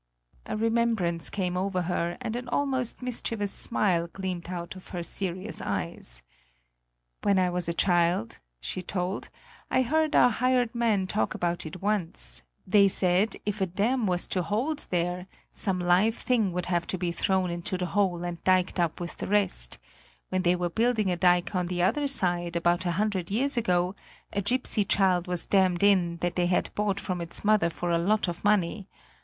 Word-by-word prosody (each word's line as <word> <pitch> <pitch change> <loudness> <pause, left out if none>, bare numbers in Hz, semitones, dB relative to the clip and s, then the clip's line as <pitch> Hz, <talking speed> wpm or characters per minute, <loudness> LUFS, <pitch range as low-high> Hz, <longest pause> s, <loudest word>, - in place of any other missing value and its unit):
A - - -3
remembrance 225 -7 +1
came 180 -3 -2
over 185 0 -1
her 175 0 -1
and 235 -2 -3
an 245 +1 -5
almost 260 -4 -1
mischievous 225 -4 -2
smile 175 -5 +1
gleamed 185 -3 -5
out 175 0 -5
of 185 - -12
her 175 -2 -5
serious 185 +3 -3
eyes: 80 -11 -4 1.0
"When 200 -1 +2
I 180 -1 +2
was 175 -1 -2
a - - 0
child," 175 - +1 0.2
she - - -4
told, 180 +1 -3 0.4
"I 260 - +3
heard 310 +4 +1
our 245 - +6
hired 250 0 +1
men 225 -5 +1
talk 205 +3 -1
about 175 -1 -2
it 180 +3 -9
once; 165 - 0 0.2
they 200 +1 +5
said, 185 +2 +2
if 205 0 -2
a 190 - +2
dam 215 +6 0
was 180 -1 +1
to 185 - 0
hold 245 - -2
there, 180 +1 -1 0.2
some 190 -3 -1
live 180 +6 +3
thing 225 -6 +1
would 180 0 -3
have 175 -1 -1
to 185 - -2
be 175 -1 -1
thrown 185 +1 0
into 175 +2 -3
the 180 - -2
hole 180 -2 0
and 175 -1 -5
diked 185 0 +2
up 170 -2 0
with 175 -1 -6
the - - -4
rest; 195 - +1 0.5
when 185 - 0
they 180 -1 +3
were 175 0 -1
building 225 -2 +1
a - - +1
dike 175 +1 +2
on 180 -2 0
the 175 0 -1
other 285 +10 +2
side, 175 -9 +1
about 175 +2 +1
a - - +1
hundred 200 -4 -1
years 260 +8 +1
ago, 180 -5 +1 0.4
a 200 - 0
gipsy 245 0 +1
child 185 -2 +2
was 180 -1 +1
dammed 185 -2 +2
in 180 -4 +3
that 175 0 -1
they 175 -1 +2
had 180 - 0
bought 205 -1 0
from 180 -3 -3
its 170 0 -1
mother 210 -5 +4
for 175 +1 -3
a 170 - +2
lot 205 +4 +1
of 175 -1 -5
money. 205 -1 +1
185 Hz, 185 wpm, -27 LUFS, 175-210 Hz, 1.0 s, our